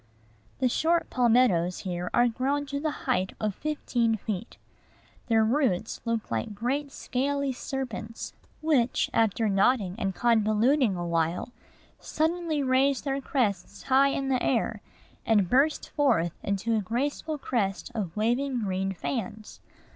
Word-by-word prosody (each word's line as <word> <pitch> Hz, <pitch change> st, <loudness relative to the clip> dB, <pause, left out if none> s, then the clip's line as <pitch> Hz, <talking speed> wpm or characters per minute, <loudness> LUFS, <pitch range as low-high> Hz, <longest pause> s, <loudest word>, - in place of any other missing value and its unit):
The 260 Hz, -, +2 dB
short 330 Hz, +7 st, +1 dB
palmettoes 230 Hz, -8 st, +3 dB
here 180 Hz, -2 st, -3 dB
are 240 Hz, 0 st, +4 dB
grown 270 Hz, +5 st, -1 dB
to 280 Hz, 0 st, -3 dB
the 310 Hz, +2 st, -1 dB, 0.2 s
height 185 Hz, +1 st, 0 dB
of 215 Hz, -2 st, -1 dB
fifteen 240 Hz, -5 st, 0 dB
feet. 210 Hz, +1 st, -5 dB, 0.7 s
Their 225 Hz, -2 st, +4 dB
roots 225 Hz, -5 st, 0 dB
look 230 Hz, -, -2 dB
like 115 Hz, -, -2 dB
great 270 Hz, +6 st, -2 dB
scaly 280 Hz, +2 st, -1 dB
serpents, 245 Hz, -4 st, -5 dB, 0.3 s
which, 280 Hz, -7 st, +2 dB
after 225 Hz, 0 st, +2 dB
knotting 200 Hz, -1 st, +2 dB
and 195 Hz, -3 st, -1 dB
convoluting 230 Hz, +1 st, +3 dB
a 175 Hz, -1 st, -3 dB
while, 165 Hz, +3 st, 0 dB, 0.5 s
suddenly 320 Hz, -1 st, -1 dB
raise 265 Hz, +1 st, +2 dB
their 275 Hz, -1 st, -1 dB
crests 200 Hz, -8 st, -1 dB
high 270 Hz, +1 st, +4 dB
in 275 Hz, -1 st, -1 dB
air, 235 Hz, -4 st, 0 dB, 0.4 s
and 210 Hz, -4 st, +3 dB
burst 275 Hz, -, +2 dB
forth 175 Hz, -, +2 dB
into 200 Hz, +3 st, -1 dB
a 215 Hz, -, +1 dB
graceful 280 Hz, -, -2 dB
crest 220 Hz, -5 st, -2 dB
of 200 Hz, -6 st, -4 dB
waving 245 Hz, +3 st, 0 dB
green 190 Hz, 0 st, -1 dB
fans. 215 Hz, +1 st, -5 dB
235 Hz, 130 wpm, -27 LUFS, 200-275 Hz, 0.7 s, are